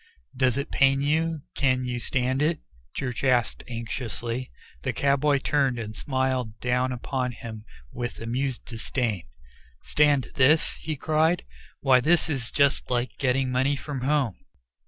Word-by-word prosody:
"Does 130 -1 +2
it 140 +2 -3
pain 135 0 +4
you? 160 +1 0
Can 130 -2 +1
you 125 -1 -2
stand 130 +2 0
it?" 155 +1 +1 0.4
Church 125 -4 -3
asked 125 -3 +2
anxiously. 115 +1 -4 0.3
The - - -2
cowboy 140 +1 +3
turned 135 -2 +1
and 110 -2 -5
smiled 130 -4 -1
down 125 +1 +1
upon 125 0 -2
him 110 -1 -8 0.3
with 120 -1 -5
amused 125 +3 -2
disdain. 115 -4 -2 0.6
"Stand 145 -3 +2
this?" 145 +4 +4
he 155 0 -4
cried. 155 +4 +1 0.4
"Why, 130 -2 +5
this 160 +4 +3
is 130 -5 -2
just 140 -1 +2
like 125 0 -1
getting 130 -1 +1
money 130 +3 +2
from 140 -1 -5
home." 135 -6 +1
130 Hz, 140 wpm, -26 LUFS, 125-140 Hz, 0.6 s, Why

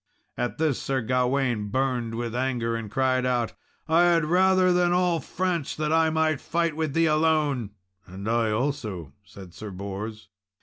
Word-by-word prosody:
At 120 0 -3
this, 155 -5 0
Sir 135 -1 -1
Gawain 125 -2 0
burned 120 0 -1
with 115 -1 -3
anger, 120 -2 -1
and 115 -2 -5
cried 130 +1 +1
out, 125 -2 0 0.3
"I 165 +2 +4
had 170 -2 +3
rather 185 +2 +4
than 175 0 +3
all 180 -2 +2
France 170 0 -2
that 155 0 -1
I 160 0 +4
might 155 -2 +1
fight 170 -2 -1
with 155 -3 -2
thee 165 0 +4
alone!" 155 -7 +1 0.4
"And 95 +3 -8
I 115 -1 +1
also," 110 - -3
said 95 -3 -13
Sir 105 - -8
Bors. 100 +3 -7
130 Hz, 165 wpm, -26 LUFS, 115-160 Hz, 0.4 s, I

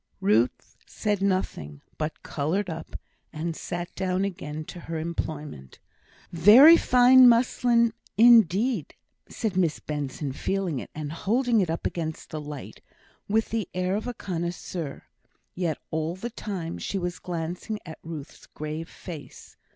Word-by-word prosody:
Ruth 110 +5 +1
said 205 -3 -2
nothing, 135 - -2 0.2
but 155 0 -4
coloured 170 +6 -1
up, 160 - -7 0.3
and 165 +1 -4
sat 175 +1 -5
down 190 0 0
again 155 -5 -5
to 175 - -9
her 165 -1 -5
employment. 155 - -5 0.5
"Very 220 - +9
fine 255 -3 +7
muslin 235 -1 +3 0.2
indeed," 225 - +5 0.3
said 220 -5 -3
Miss 170 -5 +1
Benson, 145 -1 -4
feeling 185 -2 -2
it, - - -8
and 150 -1 -5
holding 230 +6 +1
it 180 - -1
up 165 - -3
against 160 -2 -4
the 155 - -4
light, 150 -1 -8 0.5
with 220 +2 +1
the 220 -5 -2
air 185 +1 0
of 215 +3 -3
a 245 - -4
connoisseur; 170 -3 -5 0.5
yet 170 -4 -1
all 160 +2 -1
the 235 +6 -6
time 190 -7 -5
she 200 - -3
was 175 -1 -3
glancing 175 +4 -4
at 160 -2 -9
Ruth's 160 -3 -9
grave 155 +2 -6
face. 165 -6 -10
175 Hz, 140 wpm, -26 LUFS, 155-210 Hz, 0.5 s, Very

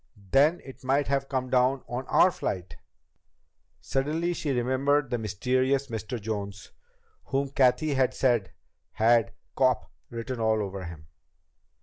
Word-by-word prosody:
"Then 150 +6 +4
it 135 -1 -12
might 135 +2 +1
have 135 0 0
come 130 -1 -2
down 130 +1 +2
on 125 +2 -5
our - - +5
flight!" 90 -5 -4 1.1
Suddenly 155 +6 -1
she 155 - -4
remembered 135 +2 +1
the 120 - 0
mysterious 130 +6 0
Mr. 115 +2 -4
Jones, 100 -2 -5 0.5
whom 135 +1 -1
Cathy 140 +3 +2
had 130 -2 +1
said 120 -7 +1 0.4
had 115 -2 +3 0.2
"cop" 130 -1 +1 0.2
written 115 +1 -5
all 110 -1 +2
over 95 -1 -6
him. 85 -2 -9
130 Hz, 130 wpm, -27 LUFS, 110-135 Hz, 1.1 s, our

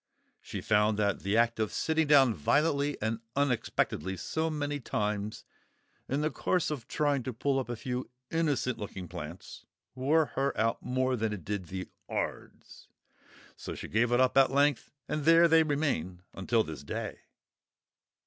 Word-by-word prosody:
She - - -6
found 105 0 +2
that 100 -1 +1
the 100 +3 0
act 115 0 +2
of 110 -2 0
sitting 160 -1 +1
down 135 -5 +6
violently 145 - +1
and 110 +1 -1 0.2
unexpectedly 120 -8 0
so 160 - -1
many 145 -2 -2
times 105 -3 -3 0.6
in 140 +3 0
the 155 +1 0
course 180 -4 0
of 135 -7 -5
trying 145 -3 +1
to 130 - -4
pull 135 +3 0
up 130 - -4
a 120 - -2
few 125 +2 -4 0.2
innocent 145 -7 0
looking 95 -3 -6
plants, 85 0 -8 0.3
wore 145 +5 +2
her 140 +1 0
out 115 +2 +1
more 130 0 0
than 110 -2 -1
it 95 -6 -7
did 100 -2 -3
the 95 +2 -5 0.2
'ards; - - -5 0.7
so - - -7
she - - -7
gave 120 +3 +1
it 120 - +3
up 130 -1 +3
at 135 - +5
length, 140 0 +2 0.2
and 150 +1 -2
there 165 +2 +7
they 165 0 +6
remain 140 - -1
until 110 +4 +1
this 80 -5 -7
day! 70 - -5
125 Hz, 165 wpm, -30 LUFS, 105-145 Hz, 0.7 s, there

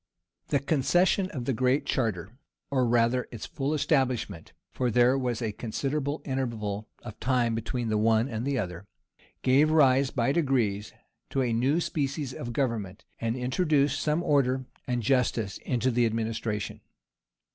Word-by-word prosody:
] - - -61
The - - +2
concession 175 +7 +2
of 130 -8 -5
the 135 - 0
Great 130 +4 +1
Charter, 105 - -1 0.4
or 130 -3 +2
rather 120 +1 +2
its 115 - -6
full 140 0 -3
establishment, 130 - 0 0.2
(for 125 -1 -1
there 120 +3 +4
was 125 -3 -1
a 110 - -1
considerable 140 +7 -3
interval 110 -6 -3
of 110 -3 -9
time 125 -3 +1
between 115 +1 -2
the 105 -1 +1
one 110 +2 +3
and 115 -3 -4
the 140 0 0
other,) 90 -3 -4 0.6
gave 135 +4 +4
rise, 135 -4 +4
by 120 0 +1
degrees, 125 -10 0 0.4
to 135 - 0
a 120 -2 0
new 130 +8 +2
species 140 -4 -2
of 120 -1 -5
government, 115 -7 -2
and 115 0 -1
introduced 140 +2 +1
some 155 +3 +1
order 130 -3 +2 0.2
and 120 -2 -1
justice 115 -5 +1
into 125 0 0
the 120 0 +3
administration. 110 -2 -3
125 Hz, 155 wpm, -28 LUFS, 115-135 Hz, 0.6 s, there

